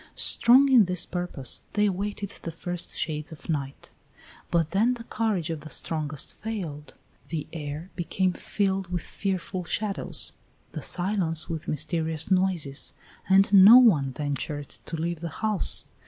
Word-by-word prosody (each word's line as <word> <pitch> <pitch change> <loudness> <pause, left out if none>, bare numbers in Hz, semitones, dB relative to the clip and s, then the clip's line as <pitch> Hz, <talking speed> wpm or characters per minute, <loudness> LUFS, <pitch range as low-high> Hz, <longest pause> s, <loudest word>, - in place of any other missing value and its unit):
Strong 265 +4 +5
in 240 -6 +7
this 180 -1 +1
purpose 175 -8 -3
they 210 0 +3
awaited 200 +1 -2
the 165 - -5
first 175 +1 -5
shades 150 0 -2
of 160 - -11
night; 140 -3 -4 0.6
but 165 -2 +1
then 225 +6 +2
the 235 - -9
courage 210 -8 -1
of 160 - -4
the 155 - -10
strongest 155 -3 -4
failed. 175 -10 -6 0.3
The 155 -3 -4
air 155 +2 -6
became 185 +1 0
filled 195 -1 -1
with 175 -1 -3
fearful 190 -1 -3
shadows, 205 +4 -2 0.4
the - - -6
silence 175 -4 -1
with 160 -2 -5
mysterious 160 +2 -1
noises, 180 -7 +1 0.4
and 195 +1 +5
no 200 +5 +10
one 165 - +5
ventured 145 +1 -4 0.2
to 165 - -4
leave 170 +1 -2
the 170 +1 -4 0.2
house. 215 -2 +2
175 Hz, 145 wpm, -26 LUFS, 155-195 Hz, 0.6 s, no